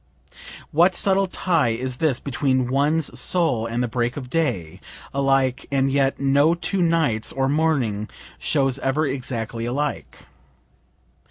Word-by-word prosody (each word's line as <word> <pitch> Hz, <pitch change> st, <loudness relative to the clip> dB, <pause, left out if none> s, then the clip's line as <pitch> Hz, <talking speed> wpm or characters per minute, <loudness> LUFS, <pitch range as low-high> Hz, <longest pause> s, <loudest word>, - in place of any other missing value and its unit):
(What 175 Hz, +4 st, +4 dB
subtle 195 Hz, +1 st, +3 dB
tie 165 Hz, -7 st, +1 dB
is 130 Hz, 0 st, -4 dB
this 145 Hz, -5 st, +1 dB
between 130 Hz, -2 st, 0 dB
one's 145 Hz, +3 st, 0 dB
soul 150 Hz, -11 st, +1 dB
and 115 Hz, +2 st, -1 dB
the -, -, 0 dB
break 120 Hz, +3 st, -2 dB
of 125 Hz, -3 st, -7 dB
day? 100 Hz, -, -2 dB, 0.3 s
Alike, 135 Hz, -2 st, +1 dB
and 135 Hz, -1 st, +1 dB
yet 135 Hz, -1 st, +1 dB
no 140 Hz, +4 st, +3 dB
two 180 Hz, +2 st, -1 dB
nights 160 Hz, -10 st, +1 dB
or 135 Hz, 0 st, 0 dB
morning 135 Hz, -9 st, 0 dB, 0.3 s
shows 135 Hz, -3 st, 0 dB
ever 140 Hz, +4 st, 0 dB
exactly 120 Hz, -4 st, -3 dB
alike.) 140 Hz, +4 st, -4 dB
135 Hz, 135 wpm, -22 LUFS, 125-155 Hz, 0.3 s, What